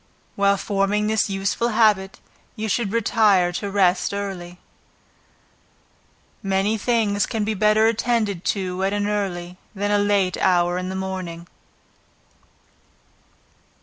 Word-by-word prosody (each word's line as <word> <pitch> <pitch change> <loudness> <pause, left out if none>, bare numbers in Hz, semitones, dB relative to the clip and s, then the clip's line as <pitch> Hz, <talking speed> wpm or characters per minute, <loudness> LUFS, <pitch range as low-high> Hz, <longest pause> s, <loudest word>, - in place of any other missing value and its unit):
While 200 0 +2
forming 200 +1 0
this 215 -1 +1
useful 195 +4 -1
habit, 215 -4 +2 0.4
you 220 +1 -4
should 215 -1 -1
retire 210 -5 +3
to 200 +3 -4
rest 195 -1 +1
early. 185 -3 -6 1.8
Many 195 +2 0
things 215 -2 0
can 220 -3 -2
be 215 +1 -1
better 215 +1 +3
attended 225 -5 0
to 190 -2 -2
at 195 +1 0
an 205 0 -1
early, 180 -4 -3 0.2
than 205 +1 -1
a 205 - +3
late 200 -3 +1
hour 175 -1 +2
in 185 0 -4
the 190 - -4
morning. 185 -3 -5
200 Hz, 120 wpm, -22 LUFS, 190-210 Hz, 1.8 s, retire